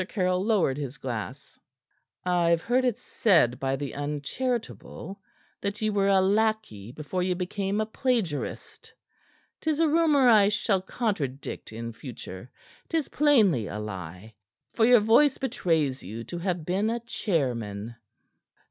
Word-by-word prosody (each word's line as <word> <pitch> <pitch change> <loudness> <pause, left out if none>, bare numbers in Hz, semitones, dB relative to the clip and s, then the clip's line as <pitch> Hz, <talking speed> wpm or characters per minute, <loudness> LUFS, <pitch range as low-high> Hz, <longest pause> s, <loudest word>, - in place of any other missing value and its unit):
Caryll 185 -2 0
lowered 195 -11 +2
his 140 0 -5
glass. 130 0 -6 0.7
"I've 170 -2 +2
heard 255 +2 +2
it 240 -3 +1
said 180 - +2
by 135 0 0
the 140 -1 -5
uncharitable 190 - -4 0.4
that 200 +1 -3
ye 215 -1 0
were 200 -1 +2
a 195 -1 +5
lackey 200 - 0
before 155 +7 -4
ye 180 0 0
became 195 +3 -2
a 215 - +1
plagiarist. 220 - -3 0.7
'Tis 315 -1 0
a 330 - +4
rumor 300 -4 +4
I 210 -4 +6
shall 210 -2 +1
contradict 175 - -3
in 115 +1 -6
future; 115 -3 -9 0.4
'tis 325 -3 -1
plainly 215 - +3
a 105 - -5
lie, 95 0 -7 0.4
for 225 - +3
your 245 -3 +7
voice 240 +6 +4
betrays 165 - 0
you 110 +5 -7
to 175 +8 -6
have 175 -3 -2
been 195 +5 0
a 235 +1 -1
chairman." 120 - -2
185 Hz, 140 wpm, -27 LUFS, 135-220 Hz, 0.7 s, your